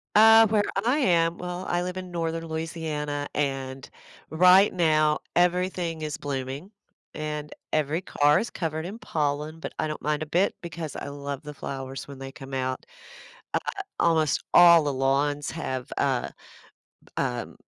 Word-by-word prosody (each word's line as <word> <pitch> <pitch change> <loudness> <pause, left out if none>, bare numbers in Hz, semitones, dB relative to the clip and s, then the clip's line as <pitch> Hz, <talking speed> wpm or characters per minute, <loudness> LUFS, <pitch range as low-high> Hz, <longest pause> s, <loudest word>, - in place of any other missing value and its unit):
Uh, 225 +1 +8
where 210 0 +2 0.2
I 250 +5 +3
am, 170 - +2
well, 180 +1 -5
I 175 - 0
live 180 +1 -4
in 185 -1 -6
Northern 165 -1 -3
Louisiana, 160 -3 -3
and 135 -2 -2 0.4
right 180 +5 +6
now, 155 -3 +3 0.2
everything 175 -2 +1
is 150 - -3
blooming, 140 +5 -5 0.4
and 150 -1 -4 0.2
every 155 +1 +1
car 150 -5 +3
is 235 - -3
covered 160 -1 -3
in 200 +5 -6
pollen, 150 -3 -2
but - - -6
I - - 0
don't 155 - -5
mind 150 +1 -1
a - - -5
bit 175 +6 +1
because 165 -3 -6
I - - -5
love 140 0 -6
the 150 0 -8
flowers 135 -1 -6
when 140 -1 -9
they 135 0 -7
come 135 +1 -11
out. 130 0 -2 0.7
Uh, - - +3 0.4
almost 160 -3 +2
all 170 -2 +8
the 145 -1 -1
lawns 140 +2 +1
have, 130 -6 -4
uh, - - +1 0.9
um, - - -2
155 Hz, 155 wpm, -26 LUFS, 145-175 Hz, 0.9 s, Uh